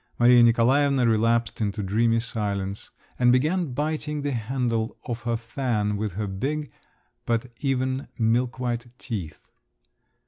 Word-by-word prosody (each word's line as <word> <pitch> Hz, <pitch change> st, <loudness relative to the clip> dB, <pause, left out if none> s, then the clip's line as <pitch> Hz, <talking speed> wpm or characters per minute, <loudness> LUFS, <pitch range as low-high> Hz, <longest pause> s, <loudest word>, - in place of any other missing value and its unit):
Maria 120 Hz, 0 st, +6 dB
Nikolaevna 125 Hz, +3 st, +4 dB
relapsed 115 Hz, +1 st, +1 dB
into 105 Hz, 0 st, -1 dB
dreamy 115 Hz, +4 st, +2 dB
silence, 100 Hz, -4 st, -3 dB, 0.3 s
and 125 Hz, -1 st, +5 dB
began 155 Hz, +5 st, +1 dB
biting 150 Hz, +1 st, -2 dB
the 145 Hz, -, -1 dB
handle 115 Hz, -1 st, -1 dB
of 120 Hz, -1 st, -4 dB
her 120 Hz, -1 st, +1 dB
fan 115 Hz, -3 st, -1 dB
with 105 Hz, -2 st, -3 dB
her 105 Hz, +3 st, -2 dB
big, 135 Hz, +10 st, -3 dB, 0.6 s
but 120 Hz, +1 st, 0 dB
even, 130 Hz, -1 st, -1 dB
milkwhite 120 Hz, +1 st, 0 dB
teeth. 95 Hz, -, -6 dB
120 Hz, 125 wpm, -25 LUFS, 110-130 Hz, 0.6 s, Maria